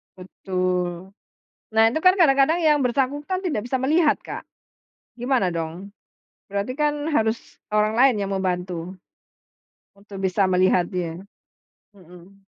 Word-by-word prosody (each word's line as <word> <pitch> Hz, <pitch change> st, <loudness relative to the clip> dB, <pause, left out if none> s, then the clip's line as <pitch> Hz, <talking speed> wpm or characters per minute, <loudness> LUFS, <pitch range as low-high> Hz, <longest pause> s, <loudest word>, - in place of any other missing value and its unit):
Betul. 185 Hz, -1 st, -3 dB, 0.6 s
Nah, 220 Hz, 0 st, +5 dB
itu 315 Hz, -, -1 dB
kan 365 Hz, +2 st, +5 dB
kadang-kadang 310 Hz, 0 st, +4 dB
yang 305 Hz, -3 st, +3 dB
bersangkutan 285 Hz, +8 st, -1 dB
tidak 290 Hz, -, -2 dB
bisa 245 Hz, +2 st, -1 dB
melihat 300 Hz, +3 st, +3 dB
Kak, -, -, -7 dB, 0.7 s
gimana 245 Hz, -7 st, 0 dB
dong, 170 Hz, +4 st, -6 dB, 0.5 s
berarti 200 Hz, +4 st, -3 dB
kan 295 Hz, +1 st, 0 dB
harus 225 Hz, -6 st, -1 dB
orang 215 Hz, +1 st, +1 dB
lain 260 Hz, 0 st, +5 dB
yang 195 Hz, -, -3 dB
membantu. 180 Hz, -2 st, -3 dB, 1.0 s
Untuk 200 Hz, 0 st, -12 dB
bisa 190 Hz, +1 st, +1 dB
melihat 180 Hz, -1 st, +2 dB
dia. 175 Hz, -1 st, -4 dB, 0.7 s
Mhm. 180 Hz, 0 st, -16 dB
200 Hz, 120 wpm, -23 LUFS, 185-275 Hz, 1.0 s, Nah